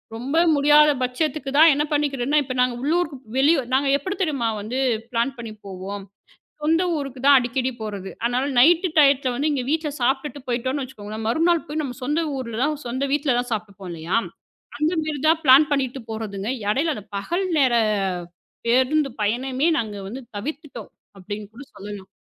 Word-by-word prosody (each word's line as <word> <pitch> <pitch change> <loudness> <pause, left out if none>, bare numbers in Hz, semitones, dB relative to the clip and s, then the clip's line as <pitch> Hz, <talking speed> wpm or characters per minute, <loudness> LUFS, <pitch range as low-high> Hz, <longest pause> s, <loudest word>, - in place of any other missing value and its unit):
ரொம்ப 260 +7 -2 0.2
முடியாத 295 +1 +6
பட்சத்துக்கு 275 +2 -2
தான் 320 +1 +8
என்ன 290 +2 +1
பண்ணிக்கறேன்னா, 290 -1 +1
இப்ப 255 - -5
நாங்க 250 -1 +1
உள்ளூர் 330 +5 +1 0.3
வெளி 285 +5 +5 0.2
நாங்க 275 +2 +2
எப்படி 375 +8 -4
தெரியுமா 280 -10 0
வந்து 225 +5 -4 0.3
பிளான் 240 +3 0
பண்ணி 230 -2 -7
போவோம். 195 +1 -6 0.6
சொந்த 325 +3 +2
ஊருக்கு 275 -3 -5
தான் 285 -1 +8
அடிக்கடி 255 +1 -1
போறது. 200 -3 -5 0.2
ஆனால் 250 +3 0
நைட் 340 +8 +6
டையத்துல 275 -3 +4
வந்து 290 +5 0
இங்க 275 -3 -1
வீட்டுல 315 -1 0
சாப்பிட்டுட்டு 270 +2 -1
போயிட்டோம்னு 260 +3 -1
வச்சுக்கோங்க, 215 -4 -9
மறுநாள் 330 +8 +2
போய் 305 +1 -3
நம்ம 255 -4 -5
சொந்த 295 +5 0 0.2
ஊர்ல 230 -4 -5
தான், 300 +2 +1
சொந்த 255 +3 -2
வீட்டுல 285 -3 +1
தான் 245 0 -3
சாப்ட்ருப்போம் 200 -3 -5
இல்லையா? 165 +5 -1 0.6
அந்த 305 +2 +1
மாரி 305 -2 -3
தான் 320 0 +4
பிளான் 280 +2 +7
பண்ணிட்டு 270 -2 0
போறதுங்க. 215 -2 -4 0.2
இடையில, 285 +10 +1
அந்த 210 -3 -9
பகல் 345 - -2
நேர 260 -4 +3 0.9
பேருந்து 260 +5 +3
பயணமே, 255 +7 0
நாங்க 215 -3 -4
வந்து 245 +7 -7 0.2
தவிர்த்துட்டோம் 300 +6 -7 0.3
அப்படின்னு 205 +2 -6
கூட 250 +5 -10
சொல்லலாம். 200 -1 -9
265 Hz, 160 wpm, -23 LUFS, 230-295 Hz, 0.9 s, தான்